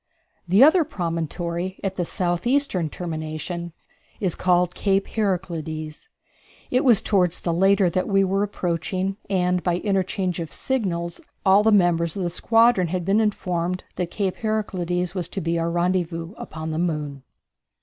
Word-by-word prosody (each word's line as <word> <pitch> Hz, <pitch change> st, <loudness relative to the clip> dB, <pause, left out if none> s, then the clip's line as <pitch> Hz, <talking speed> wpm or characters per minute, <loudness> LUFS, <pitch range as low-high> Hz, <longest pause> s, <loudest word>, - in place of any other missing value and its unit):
The 195 Hz, +8 st, +6 dB
other 320 Hz, +4 st, +6 dB
promontory, 170 Hz, -, -3 dB
at 195 Hz, -1 st, -2 dB
the 180 Hz, -, -1 dB
southeastern 180 Hz, -, 0 dB
termination, 165 Hz, +1 st, -5 dB, 0.5 s
is 185 Hz, -5 st, 0 dB
called 180 Hz, -1 st, +2 dB
Cape 195 Hz, -1 st, +1 dB
Heraclides. 170 Hz, -, -3 dB, 0.6 s
It 255 Hz, +2 st, +2 dB
was 240 Hz, -6 st, +5 dB
toward 180 Hz, -4 st, +2 dB
the 170 Hz, -1 st, -2 dB
latter 195 Hz, +2 st, +4 dB
that 185 Hz, +2 st, 0 dB
we 195 Hz, -1 st, +3 dB
were 195 Hz, +1 st, +1 dB
approaching, 190 Hz, 0 st, -2 dB
and 180 Hz, -1 st, +1 dB
by 175 Hz, -1 st, 0 dB
interchange 190 Hz, -2 st, -1 dB
of 165 Hz, -2 st, -5 dB
signals 175 Hz, -10 st, -2 dB, 0.2 s
all 195 Hz, +1 st, +6 dB
the 220 Hz, +1 st, +3 dB
members 175 Hz, -5 st, +3 dB
of 190 Hz, -, -2 dB
the 175 Hz, -, -1 dB
squadron 225 Hz, 0 st, +3 dB
had 180 Hz, 0 st, -2 dB
been 200 Hz, +3 st, +3 dB
informed 180 Hz, -4 st, -1 dB
that 180 Hz, -1 st, -2 dB
Cape 195 Hz, -2 st, -2 dB
Heraclides 180 Hz, -5 st, -1 dB
was 180 Hz, -4 st, -3 dB
to -, -, -4 dB
be 165 Hz, -1 st, -1 dB
our 165 Hz, 0 st, 0 dB
rendezvous 175 Hz, 0 st, -1 dB
upon 160 Hz, -4 st, -6 dB
the 155 Hz, -, -2 dB
moon. 150 Hz, -5 st, -2 dB
180 Hz, 150 wpm, -23 LUFS, 170-195 Hz, 0.6 s, The